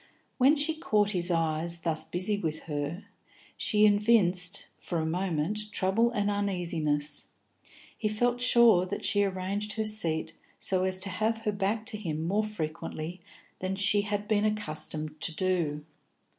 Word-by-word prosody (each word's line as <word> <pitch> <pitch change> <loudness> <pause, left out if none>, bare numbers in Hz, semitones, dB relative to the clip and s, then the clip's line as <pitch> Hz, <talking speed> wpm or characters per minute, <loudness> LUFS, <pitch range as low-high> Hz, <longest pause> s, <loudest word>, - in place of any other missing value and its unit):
When 270 +4 +5
she 300 +2 +1
caught 210 -9 +1
his 180 -2 +1
eyes 165 0 +1
thus 160 -2 0
busy 185 +4 -2
with 160 -6 -4
her, 150 +4 -5 0.5
she 210 0 +2
evinced, 205 -4 +3
for 175 - -3
a 160 - -1
moment, 185 +4 -1
trouble 205 +5 +2
and 205 -4 -2
uneasiness; 170 -7 0 0.7
he 215 - -2
felt 240 +3 0
sure 235 -7 +5
that 190 - -5
she 205 -1 +2
arranged 195 +2 -2
her 220 0 -2
seat 175 -7 +2 0.2
so 185 -1 0
as 185 0 0
to 195 - +2
have 220 +4 -1
her 215 -2 -1
back 205 +2 -2
to 225 -2 -2
him 160 -5 -4
more 205 +4 +1
frequently 170 -3 -6 0.4
than 185 +1 -3
she 205 +1 +2
had 205 0 -4
been 210 -2 +1
accustomed 155 -7 -2
to 165 - +3
do. 165 -6 -1
195 Hz, 155 wpm, -28 LUFS, 165-215 Hz, 0.7 s, When